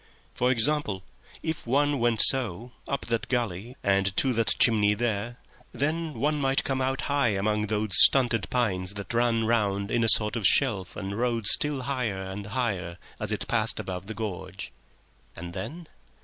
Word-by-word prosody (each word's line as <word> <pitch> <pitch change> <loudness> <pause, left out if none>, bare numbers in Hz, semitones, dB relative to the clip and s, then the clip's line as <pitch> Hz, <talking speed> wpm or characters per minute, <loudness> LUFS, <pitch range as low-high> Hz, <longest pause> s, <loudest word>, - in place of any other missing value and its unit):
For 125 - 0
example; 120 -5 0 0.4
if 160 -6 -4
one 145 +2 +1
went 115 -2 +2
so, 120 -3 +4 0.2
up 140 - -3
that 115 -1 -3
gully 120 -1 -3
and 95 -1 0
to 130 -2 +1
that 115 -1 +2
chimney 105 -3 +3
there, 120 +1 -3 0.4
then 155 +2 -3
one 150 +1 -1
might 135 0 0
come 135 -1 -2
out 135 +1 -1
high 140 -7 0
among 105 +2 -1
those 105 0 -2
stunted 120 -5 +4
pines 100 -6 -1
that 100 +3 -7
ran 115 -1 +1
round 105 -3 -1
in 120 - +1
a 115 - +3
sort 105 +1 +4
of 115 - -4
shelf 105 -10 +1
and 100 +2 -5
rose 115 -4 +1
still 145 -3 0
higher 125 -7 -3
and 95 +2 -7
higher 100 -7 -3 0.2
as - - -4
it - - -4
passed - - -1
above 90 0 -6
the 110 - -6
gorge. 105 -4 -6 0.6
And 85 +1 -9
then? 155 - -7
115 Hz, 170 wpm, -26 LUFS, 100-130 Hz, 0.6 s, so